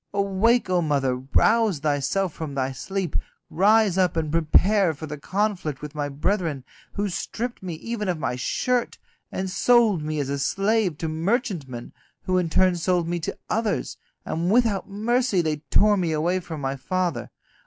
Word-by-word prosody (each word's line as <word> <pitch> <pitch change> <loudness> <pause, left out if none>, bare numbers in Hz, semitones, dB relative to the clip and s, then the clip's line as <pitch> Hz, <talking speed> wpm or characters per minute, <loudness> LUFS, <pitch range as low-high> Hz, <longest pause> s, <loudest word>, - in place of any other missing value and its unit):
Awake, 200 +4 +2
O 180 -1 +2
mother, 140 -5 +1
rouse 200 - +2
thyself 150 +5 0
from 155 -4 -6
thy 135 -1 -1
sleep, 190 +5 -4 0.4
rise 205 +1 +4
up 180 -2 +2
and 155 -2 -1
prepare 165 +3 +3
for 155 - -7
the 150 -1 -6
conflict 185 -6 -2
with 150 0 -6
my 145 -1 -2
brethren, 150 -1 -1 0.3
who 205 0 -1
stripped 235 +6 -4
me 180 -3 -5
even 210 +3 -4
of 175 - 0
my 155 -5 -2
shirt, 245 - -1 0.3
and 190 - -3
sold 220 -2 +3
me 155 0 -3
as 140 - -1
a 140 0 -2
slave 195 +2 +1
to 160 - -3
merchantmen, 160 - -2 0.3
who 185 0 +1
in 175 -2 -1
turn 185 +2 +3
sold 175 0 +1
me 175 0 -1
to 160 - -4
others, 215 -4 -1 0.3
and 170 +2 -1
without 220 -4 +2
mercy 225 +1 +1
they 155 -3 0
tore 210 0 +4
me 175 -4 0
away 170 +4 +1
from 160 -4 -7
my 135 0 -2
father. 180 +6 -2
180 Hz, 170 wpm, -24 LUFS, 155-205 Hz, 0.4 s, rise